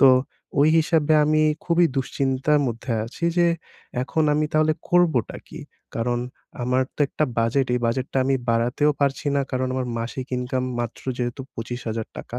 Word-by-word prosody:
তো 135 - +8 0.5
ওই 150 - +6
হিসাবে 160 -1 +2
আমি 155 +1 +3 0.2
খুবই 170 0 +4
দুশ্চিন্তার 135 +2 +1
মধ্যে 120 +1 -4
আছি 130 +8 -6
যে 175 - +5 0.6
এখন 160 +4 0
আমি 150 0 +1
তাহলে 155 0 +3 0.2
করবোটা 170 -9 +2
কী? - - -9 0.4
কারণ 120 +1 0 0.4
আমার 125 +1 +2
তো - - -13
একটা 155 - 0
বাজেট। 125 +4 +2
এই 125 - 0
বাজেটটা 130 +3 -1
আমি 135 0 +2
বাড়াতেও 120 +6 +2
পারছি 140 +1 0
না। - - +3
কারণ, 130 0 0
আমার 130 -1 -1
মাসিক 125 +3 -4
ইনকাম 125 +1 -2 0.2
মাত্র 120 -1 -5 0.2
যেহেতু 120 +2 -2
৳২৫,০০০। 115 0 -5
130 Hz, 155 wpm, -23 LUFS, 120-150 Hz, 0.6 s, তো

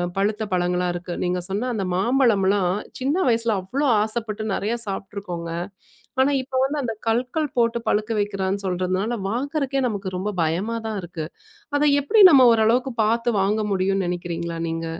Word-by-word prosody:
பழுத்த 210 +2 0
பழங்களா 180 0 +1
இருக்கு. 175 0 -5
நீங்கச் 180 0 -1
சொன்ன 210 +6 -2
அந்த 210 -4 -2
மாம்பழம்ல்லாம் 200 -4 +2 0.3
சின்ன 270 +4 0
வயசுல 230 -1 +1
அவ்ளோ 270 +11 -1 0.2
ஆசைப்பட்டு 220 -1 -3
நெறய 215 +4 -1
சாப்பிட்டிருக்கோங்க. 195 -3 -5 0.7
ஆனா 270 +2 +3
இப்ப 260 +1 -8
வந்து 290 +3 -1
அந்தக் 225 -4 -5
கல்கள் 250 +7 0
போட்டுப் 235 0 +1
பழுக்க 215 +2 +1
வெக்கறேன்னு 200 -1 -2
சொல்றதுனால 185 +5 -1
வாங்கறதுக்கே 275 +3 -1
நமக்கு 200 -4 -3
ரொம்ப 200 +3 -2
பயமாதான் 215 +7 -2
இருக்கு. 170 -2 -6 0.5
அத 290 - +2 0.2
எப்டி 420 +10 +5
நம்ம 265 -5 +7
ஒரு 220 - +2
அளவுக்குப் 245 +1 +1
பாத்து 230 +2 +1
வாங்க 210 +3 +1
முடியும்னு 195 0 +1
நெனைக்கிறீங்களா 170 -1 -4
நீங்க? 165 0 -3
210 Hz, 150 wpm, -23 LUFS, 185-240 Hz, 0.7 s, நம்ம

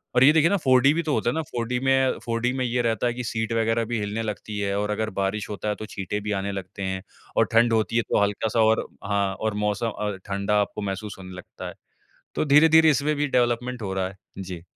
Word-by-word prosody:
और 125 - +6
ये 140 - +8
देखिए 160 +1 +4
ना 200 - +2
फ़ोर 130 -7 +4
डी 135 +3 +5
भी 170 - 0
तो 155 -2 -1
होता 110 0 +1
है - - -5
ना 160 - 0
4D 120 +1 -1
में 135 0 +3
फ़ोर 115 -1 -1
डी 125 +1 +1
में 130 -1 -1
ये 125 0 0
रहता 115 +1 +1
है 120 - 0
कि 125 +1 -5
सीट 110 0 -2
वग़ैरह 115 0 +1
भी 120 0 -2
हिलने 105 +2 -2
लगती 105 -1 -5
है 100 -1 -1
और 105 +1 -1
अगर 110 +1 -1
बारिश 100 +2 -1
होता 105 0 -3
है 105 - 0
तो 110 - -5
छींटे 105 0 -4
भी 105 +1 -3
आने 100 +1 -3
लगते 95 0 -6
हैं। 95 0 -3 0.3
और - - +5
ठंड 115 +1 +5
होती 110 0 +1
है - - +4
तो - - +3
हल्का-सा 105 +3 0
और 110 0 +3 0.2
हाँ 100 -1 0
और 110 +1 -2
मौसम 105 +3 0
अ, 105 -2 -3
ठंडा 100 +1 0
आपको 105 +1 -4
महसूस 100 +1 -4
होने 95 -1 -9
लगता 90 - -9
है। - - -9 0.6
तो - - +1
धीरे-धीरे 160 +2 +6
इसमें 150 +2 +1
भी 145 +1 +1
डेवलपमेंट 125 -1 0
हो 95 -2 -3
रहा 95 -1 -1
है। 95 - -13 0.2
जी। 90 -3 -7
110 Hz, 255 wpm, -25 LUFS, 100-125 Hz, 0.6 s, ये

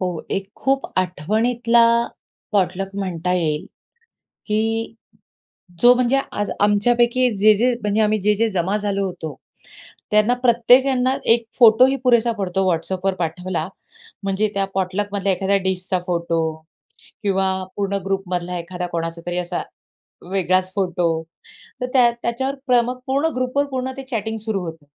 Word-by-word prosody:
हो. 180 -3 -2
एक 195 0 -3
खूप 270 0 0 0.2
आठवणीतला 230 +7 +2 0.7
पॉटलक 195 -1 0
म्हणता 180 -3 -2
येईल 165 -1 -1 0.8
की 225 +1 -1 0.9
जो 245 +1 +8
म्हणजे 250 +2 +2
आज 205 - -2
आमच्यापैकी 240 +4 +3
जे-जे 215 +5 +4
म्हणजे 210 +1 +1
आम्ही 215 0 +2
जे-जे 210 +3 +2
जमा 190 +1 0
झालो 200 -1 -1
होतो 160 -5 -6 0.8
त्यांना 215 +3 +4
प्रत्येक 245 +2 +5
यांना 260 0 +1 0.2
एक 235 0 -2
फोटोही 250 +3 +6
पुरेसा 235 -2 +4
पडतो 190 -1 -1
WhatsAppवर 185 +3 -1
पाठवला. 175 0 -3 0.6
म्हणजे 200 +2 0
त्या 195 0 +1
पॉटलकमधल्या 195 +1 -1
एखाद्या 195 +2 +1
डिशचा 185 0 -1
फोटो 170 -1 0 0.8
किंवा 195 -2 +1 0.3
पूर्ण 200 -1 -1
ग्रुपमधला 180 -2 -2
एखादा 180 +1 -5
कोणाचा 165 -1 -4
तरी 175 0 -2
असा 175 0 -3 0.7
वेगळाच 185 -1 +1
फोटो, 175 -4 0 0.6
तर 250 - -1
त्या 245 -3 +5
त्याच्यावर 265 +4 -1
प्र 245 -1 +5
मग 250 +1 -4
पूर्ण 275 +4 +1
ग्रुपवर 255 +3 0
पूर्ण 260 -1 -3
ते 270 - -6
चॅटिंग 220 -2 -2
सुरू 215 -2 -2
होतं. 160 -3 -9
200 Hz, 130 wpm, -21 LUFS, 180-235 Hz, 0.9 s, जो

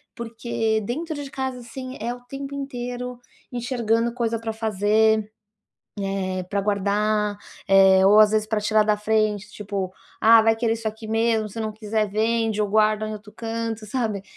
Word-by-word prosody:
porque 225 -2 -2
dentro 310 +10 -3
de 275 - -8
casa, 265 -1 -3
assim, 255 +2 -8
é 235 +2 -2
o - - -13
tempo 275 +3 -7
inteiro 250 -2 -5 0.3
enxergando 235 -2 0
coisa 230 -2 -1
para 225 0 -3
fazer, 220 0 +2 0.7
eh, 190 -1 -2
para 200 +1 0
guardar, 210 +1 0 0.3
eh, 190 -1 +6
ou 205 +2 +7
às 215 -1 +7
vezes 215 0 +1
para 215 -1 -1
tirar 215 0 +3
da 210 0 +2
frente, 210 -1 0
tipo: 200 -3 -4 0.3
"Ah, 225 +1 +8
vai 225 0 +4
querer 225 0 +1
isso 225 0 -7
aqui 220 +1 -9
mesmo, 225 -1 +1
se 225 +3 -7
não 215 -1 -2
quiser, 215 0 -1
vende 220 0 +1
ou 205 - -1
guarda 215 +1 +2
em - - -4
outro 210 0 -10
canto", 225 -1 -4
sabe, 215 -4 -2
220 Hz, 170 wpm, -23 LUFS, 210-235 Hz, 0.7 s, Ah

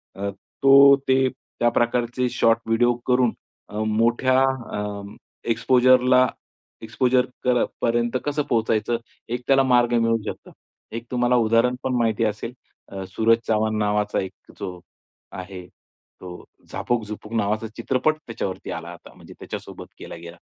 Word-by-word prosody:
अ, 100 +1 -3 0.3
तो 140 0 +8
ते 130 0 +3
त्या 120 - -2
प्रकारचे 120 +1 0
शॉर्ट 115 -1 +2
व्हिडिओ 120 +2 +3
करून 125 -2 +3 0.4
अ, 105 +1 -5
मोठ्या 120 +4 +2 0.4
अ, 105 0 -4 0.5
एक्सपोजरला 125 +2 +4 0.6
एक्सपोजर 125 +2 +1 0.2
कर 125 -1 +3 0.2
पर्यंत 120 +1 +1
कसं 145 0 0
पोहचायचं 115 0 +1 0.4
एक 125 - -5
त्याला 135 0 +5
मार्ग 120 -2 +3
मिळू 115 0 +2
शकतं. - - -7 0.4
एक 115 +1 -6
तुम्हाला 125 0 +2
उदाहरण 115 +2 +3
पण 130 - -1
माहिती 115 -1 +1
असेल, 110 +3 -3 0.4
अ, 95 -1 -6
सूरज 115 +3 +3
चव्हाण 110 0 +1
नावाचा 105 0 0
एक 95 - -5 0.3
जो, 90 -1 -6 0.5
आहे 95 -1 -8 0.6
तो 90 -1 -9 0.2
झापक-झुपुक 110 -2 -4
नावाचा 110 0 0
चित्रपट 130 +6 +1
त्याच्यावरती 100 -5 -5
आला - - -6
आता. - - -15
म्हणजे - - -14
त्याच्यासोबत - - -8
केला - - -8
गेला. 85 0 -11
115 Hz, 135 wpm, -23 LUFS, 105-125 Hz, 0.6 s, तो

